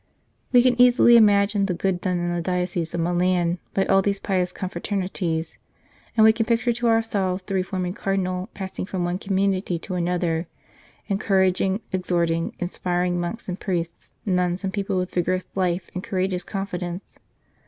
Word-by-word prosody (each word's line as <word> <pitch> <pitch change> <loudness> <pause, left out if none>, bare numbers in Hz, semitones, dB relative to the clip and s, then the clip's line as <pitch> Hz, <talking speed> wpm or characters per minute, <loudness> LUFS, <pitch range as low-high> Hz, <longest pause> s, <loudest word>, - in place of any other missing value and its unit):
We 245 -1 +6
can 250 -1 +3
easily 245 -1 +7
imagine 205 -2 +4
the 180 - -1
good 180 0 -1
done 180 -2 0
in 175 0 -1
the 175 - -1
Diocese 180 -1 -1
of 170 - -1
Milan 175 0 +1 0.2
by 195 - +2
all 195 0 +4
these 200 0 0
pious 185 -3 0
confraternities, 180 -3 -3 0.6
and 220 - +6
we 220 0 +7
can 225 -1 -1
picture 235 +1 +2
to 240 +1 -1
ourselves 200 -5 +1
the 195 - -6
reforming 185 -1 -1
Cardinal 185 -1 -2
passing 190 -1 -5
from 185 -3 -2
one 175 +1 -2
community 195 -2 0
to 185 +3 -7
another, 175 -2 -1 0.6
encouraging, 195 0 +1
exhorting, 170 -3 0
inspiring 175 0 -1
monks 175 +7 -4
and 185 +1 -4
priests, 170 -4 -4
nuns 180 -1 0
and 190 -1 -2
people, 200 -2 -1
with 180 0 -2
vigorous 185 +1 0
life 180 -2 -1
and 185 - -4
courageous 185 -1 -1
confidence. 180 -2 -5
185 Hz, 160 wpm, -24 LUFS, 175-195 Hz, 0.6 s, easily